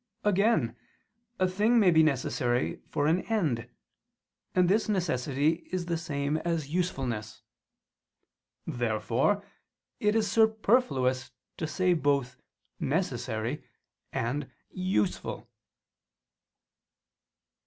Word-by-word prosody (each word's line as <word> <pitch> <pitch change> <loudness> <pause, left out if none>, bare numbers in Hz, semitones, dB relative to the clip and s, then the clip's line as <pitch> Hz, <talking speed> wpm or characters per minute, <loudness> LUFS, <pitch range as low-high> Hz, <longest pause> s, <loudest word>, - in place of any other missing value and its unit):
Again 200 - +2 0.6
a 185 - +3
thing 210 +6 +3
may 190 -5 +5
be 160 -1 +6
necessary 125 -4 0
for 145 - 0
an 165 +4 +3
end: 145 - 0 0.9
and 180 -1 +4
this 215 +4 +2
necessity 155 -4 0
is 185 -1 -2
the 170 -1 -1
same 145 -2 -1
as 165 -3 -2
usefulness. 130 -12 -2 1.2
Therefore 120 - 0 0.5
it 210 0 +2
is 220 -2 +2
superfluous 220 - +2 0.3
to 160 - -2
say 180 +3 +2
both 140 -6 0 0.4
"necessary" 125 - -2 0.5
and 130 +4 -2 0.2
"useful." 185 - -1
160 Hz, 90 wpm, -29 LUFS, 130-185 Hz, 1.2 s, be